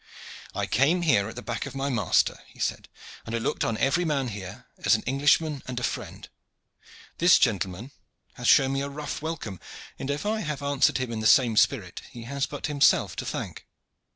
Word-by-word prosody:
"I - - -1
came 160 - +2
here 110 -11 +3
at 110 - -10
the 125 - -7
back 120 -1 -4
of - - -9
my 135 +1 -2
master," 120 -5 +1
he - - -20
said, - - -2 0.4
"and 115 - -4
I - - +1
looked 115 - -1
on 115 - -1
every 135 +9 +2
man 140 -6 0
here 100 -4 -8 0.2
as - - +5
an - - -3
Englishman 145 +2 +2
and 125 -1 -3
a - - -6
friend. - - -4 0.9
This 175 +2 +7
gentleman 100 +2 -1 0.4
hath 120 -2 -4
shown 135 -1 +5
me 135 - 0
a 140 - -3
rough 145 +1 -5
welcome, 145 - -5 0.4
and 135 - -5
if 145 +6 -2
I 215 +1 0
have 150 -7 -4
answered 140 0 +2
him 130 -2 -3
in 115 - -3
the 110 - +1
same 120 -4 +5
spirit - - +1
he 120 - -10
has 140 +3 -2
but 145 - -6
himself 145 -2 +3
to - - -4
thank. - - -5
135 Hz, 205 wpm, -26 LUFS, 115-145 Hz, 0.9 s, This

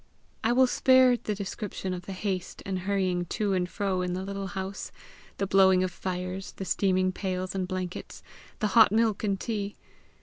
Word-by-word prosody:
I 225 - +3
will 260 +2 +5
spare 255 0 +5
the 215 -3 -3
description 195 -1 -4
of 180 -1 -7
the 195 - -4
haste 185 -1 -4
and 190 -1 -2
hurrying 185 -2 0
to 205 +3 -1
and 180 -1 0
fro 190 -2 -1
in 180 0 -1
the 185 +1 -3
little 195 0 -4
house 190 0 -5 0.5
the 195 - 0
blowing 190 -1 +5
of 185 - -1
fires, 185 +1 -4
the 195 - -6
steaming 185 -1 +2
pails 185 -1 -3
and 190 -2 -2
blankets, 185 -1 -5 0.4
the 210 - +2
hot 225 -4 +7
milk 220 -1 +2
and 200 -2 0
tea! 205 -3 -3
190 Hz, 180 wpm, -28 LUFS, 185-205 Hz, 0.5 s, hot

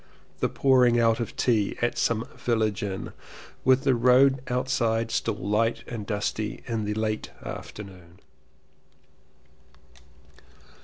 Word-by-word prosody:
The - - +1
pour 130 -2 +3
ing 120 -1 +4
out 115 0 +3
of 115 - -4
tea 110 -5 +1
at 120 0 0
some 115 0 0
Village 110 -4 0
Inn, 95 -2 -4 0.5
with 130 +1 +4
the 135 - +3
220 120 - +1
LLEWELLYN 125 +3 +6 0.2
POWYS - - -10
road 125 0 +1
outside 115 -3 0
still 115 - -1
light 105 +3 0
and 110 -4 -6
dusty 105 0 -3
in 115 -3 -2
the 105 0 -2
late 110 0 -2 0.2
afternoon. 90 -4 -9
115 Hz, 140 wpm, -26 LUFS, 105-125 Hz, 0.5 s, LLEWELLYN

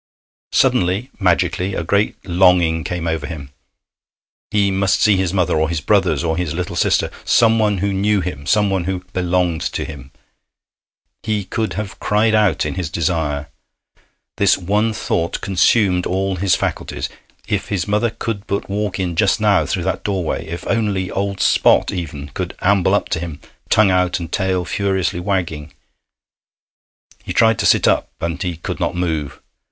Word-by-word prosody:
Suddenly, 95 +9 +2
magically, 90 0 +1
a - - -2
great 100 +5 +1
longing 90 -3 +3
came 90 0 -3
over 80 -3 -2
him. 70 -4 -8 1.0
He 100 -2 +2
must 95 0 +1
see 105 -2 +4
his 95 -2 0
mother, 90 -2 +1
or 80 0 +1
his 85 -2 -1
brothers, 75 - +2
or 80 -1 0
his 85 -3 -2
little 90 0 -3
sister - - +1
someone 110 -3 +3
who 100 - 0
knew 100 +2 +2
him, 80 -6 -5
someone 95 0 +2
who 95 -1 -3
belonged 90 -2 0
to - - -3
him. 70 -4 -9 1.1
He 105 -2 -1
could 110 0 -3
have 100 +2 -5
cried 110 +1 +2
out 105 -8 +2
in - - -2
his 90 -4 -3
desire. 80 -4 -1 0.9
This - - +4
one 105 +5 0
thought 85 -5 -2
consumed 95 -1 +2
all 95 0 -1
his 95 0 +2
faculties. - - -3 0.4
If - - -1
his 100 -3 -2
mother 105 +3 +1
could 115 -2 -5
but 100 - -2
walk 100 -1 -2
in 90 -2 -2
just 100 +3 +2
now 100 -7 +3
through 90 - -2
that 95 -1 -2
doorway! 90 -5 -2
If 85 +2 -6
only 100 -5 -1
old 100 0 -2
Spot - - +4
even 75 -5 -5
could - - -5
amble 100 -1 +3
up - - 0
to - - -1
him, 80 -4 -6 0.3
tongue 105 -3 +4
out 90 -1 +1
and 85 -1 -7
tail 95 -2 0
furiously 95 -1 -1
wagging! 85 -6 -3 1.5
He - - -5
tried 115 -1 +3
to - - +2
sit - - +4
up, - - +2
and 85 +1 -3
he 90 -3 -3
could 85 - -5
not - - -1
move! 80 -6 -2
90 Hz, 165 wpm, -19 LUFS, 85-100 Hz, 1.5 s, see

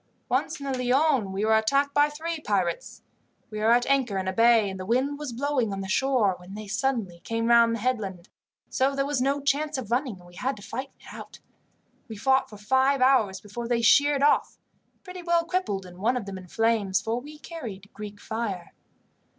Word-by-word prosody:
Once 320 +1 -1
in 280 - -7
the 260 -2 -2
Lion 260 -4 +2
we 195 +3 -1
were 220 0 +4
attacked 275 +6 +2
by 290 +1 +4
three 320 +2 -4
pirates. 190 - -2 0.5
We 215 - -5
were 215 +1 +2
at 240 +1 +4
anchor 260 -7 +1
in 190 0 -2
a 190 - -1
bay, 230 0 +5
and 190 -1 -6
the - - -4
wind 265 +5 0
was 295 -4 -5
blowing 255 -2 -1
on 195 0 -4
the 190 - -5
shore, 240 -1 +2
when 180 +2 -11
they 215 0 -7
suddenly 210 -4 -2
came 230 +4 -3
round 235 0 +5
the 230 - -6
headland, 205 -7 -2 0.4
so 270 +1 0
there 275 0 0
was 280 -2 -1
no 280 +2 +1
chance 295 +1 0
of 230 -4 -6
running, 250 -2 0
and 180 - -17
we 175 - -16
had 265 +2 -1
to 205 - -12
fight 260 +6 -5
it - - -19
out. - - -10 0.7
We 220 - -7
fought 265 +4 +2
for 210 - -11
five 265 +6 +2
hours 255 -7 +3
before 230 +3 -7
they 235 -1 0
sheered 285 +4 +5
off, 295 - +2 0.5
pretty 365 -1 -8
well 340 -1 +1
crippled, 335 - -2
and 180 0 -13
one 240 +6 +1
of 230 - -4
them 195 -1 -6
in 185 - -13
flames, 215 -2 +1
for 225 +4 -2
we 300 +3 -11
carried 235 - -9
Greek 205 -1 -8
fire. 205 -7 -4
235 Hz, 215 wpm, -26 LUFS, 205-275 Hz, 0.7 s, bay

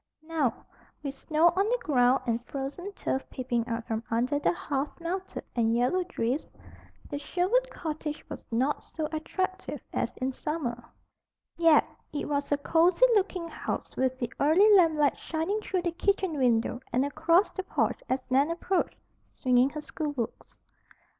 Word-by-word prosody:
Now, 315 -6 -1 0.4
with 275 -2 -3
snow 315 +4 +3
on 395 +3 +2
the - - +2
ground 255 -2 +3
and 235 -1 -1
frozen 285 +8 -5
turf 265 - -1
peeping 240 -2 -2
out 230 -1 -3
from 225 0 -2
under 250 +6 +1
the - - +2
half 290 -3 -3
melted 370 +3 -4
and 230 -1 +2
yellowed 350 +10 +1
drifts, 255 -2 -1 0.6
the 285 - -4
Sherwood 380 +12 +1
cottage 310 -2 -5
was - - -8
not 260 +6 0
so 315 -2 -4
attractive 375 +4 -3
as - - -2
in 260 +1 -1
summer. 250 -4 -3 0.7
Yet 330 -2 +5 0.2
it 295 - -3
was 285 -1 -1
a 290 - +4
cozy 340 +9 +4
looking 375 -4 +1
house - - -5
with 260 0 0
the 240 -2 -4
early 365 +9 +6
lamplight 315 -6 +4
shining 335 +7 -2
through 370 -4 -2
the 345 - 0
kitchen 380 -1 0
window 245 -3 +2
and 255 +3 +2
across 330 +6 +3
the 380 - -3
porch 380 - -1
as 260 0 -2
Nan 275 +4 +4
approached, 345 +2 -1 0.3
swinging 250 +1 +3
her 305 +1 -6
schoolbooks. 290 -7 -5
300 Hz, 155 wpm, -28 LUFS, 255-345 Hz, 0.7 s, early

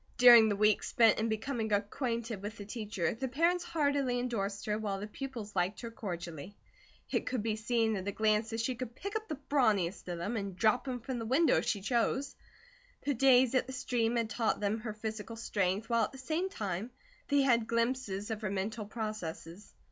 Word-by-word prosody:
During 240 -3 +9
the 205 - +1
week 210 +1 +3
spent 225 -3 +4
in 225 +1 0
becoming 220 0 -2
acquainted 225 +1 -1
with 210 +2 -6
the 205 - -7
teacher, 205 -6 -2
the 265 +4 -3
parents 335 +7 +2
heartily 285 -6 0
endorsed 205 -5 -2
her, 210 0 -1
while 200 -3 -2
the 205 - -4
pupils 230 -2 -7
liked 185 +4 0
her 235 -1 -6
cordially. 175 -4 -6 0.5
It - - 0
could 250 -5 -1
be 220 -1 0
seen 225 0 +1
at 190 0 -4
a - - 0
glance 215 +1 +1
that 225 0 -2
she 255 +3 0
could 245 -1 -6
pick 400 +7 -6
up 435 0 -2
the 310 - -3
brawniest 210 -12 +1
of 175 -1 -3
them, 205 +7 -2
and 200 -3 -4
drop 225 +7 +2
him 250 -2 -3
from 250 +1 -4
the 225 - -4
window, 300 +7 +4
if - - 0
she 200 - 0
chose. 250 +5 0 0.7
The 285 - +2
days 260 -1 +5
at 255 - +2
the 260 - -6
stream 240 -2 0
had 230 -2 0
taught 225 -1 0
them 210 +2 0
her 215 -1 -5
physical 220 +1 -5
strength, 200 -2 -1
while 230 -2 +3
at - - -8
the - - -9
same 320 +8 -2
time 205 - -3 0.4
they 285 -1 +3
had 235 -4 +3
glimpses 230 -3 -1
of 220 0 -3
her 210 - -2
mental 205 +2 -3
processes. 210 -4 -6
225 Hz, 210 wpm, -32 LUFS, 205-250 Hz, 0.7 s, During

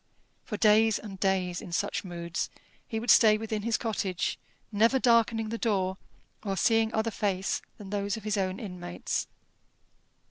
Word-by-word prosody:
For 210 - -4
days 215 +1 +5
and 195 -3 -9
days, 185 -2 0
in - - -9
such 200 +4 -1
moods, 170 -2 -4 0.4
he 220 - -3
would 235 - +3
stay 215 -2 +7
within 220 -1 -3
his 225 +1 0
cottage, 200 -5 -2 0.3
never 225 +5 +4
darkening 230 -3 +3
the 230 +1 -4
door 190 -4 0 0.4
or 195 -3 -3
seeing 225 +3 +3
other 220 0 0
face 195 -2 -1 0.2
than 200 -2 -10
those 205 +1 -1
of 220 - -9
his 215 0 -1
own 190 -1 -1
inmates. 180 -4 -4
210 Hz, 155 wpm, -28 LUFS, 190-225 Hz, 0.4 s, stay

